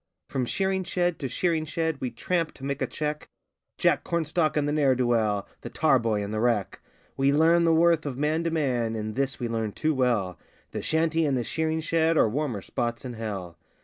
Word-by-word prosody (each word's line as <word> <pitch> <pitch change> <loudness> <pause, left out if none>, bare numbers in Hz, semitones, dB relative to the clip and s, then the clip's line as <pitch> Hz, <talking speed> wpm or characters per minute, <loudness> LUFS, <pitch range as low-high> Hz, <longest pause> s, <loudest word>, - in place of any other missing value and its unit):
From 130 -2 -1
shearing 190 +3 0
shed 175 -1 -1
to 135 - -2
shearing 165 +2 0
shed 160 -2 -2
we 130 - -1
tramp 165 +8 -1
to 135 - -14
make 140 0 -3
a - - +1
cheque 150 0 -4 0.5
Jack - - +2
Cornstalk 160 -1 0
and 145 -1 +1
the - - 0
ne'er 145 -3 +3
do 125 0 +1
weel 110 -4 +1
the - - -7
tar 150 -5 +3
boy 110 -3 0
and 100 +1 -5
the 110 - -1
wreck. 110 -5 0 0.4
We 135 +1 +3
learn 165 +3 +4
the 165 - +4
worth 165 -2 +3
of 130 -3 -4
man 155 +3 0
to - - +2
man 125 -8 0
and 110 0 -3
this 135 +2 -1
we 120 - -2
learn 110 -2 -2
too 155 0 0
well 115 - 0 0.3
The - - -4
shanty 160 +1 +1
and 140 -4 +1
the 120 - -1
shearing 160 +4 -1
shed 165 0 +2
are - - +5
warmer 125 -3 -2
spots 120 +1 -3
in 125 - -5
hell! 100 -7 -6
140 Hz, 215 wpm, -26 LUFS, 115-160 Hz, 0.5 s, are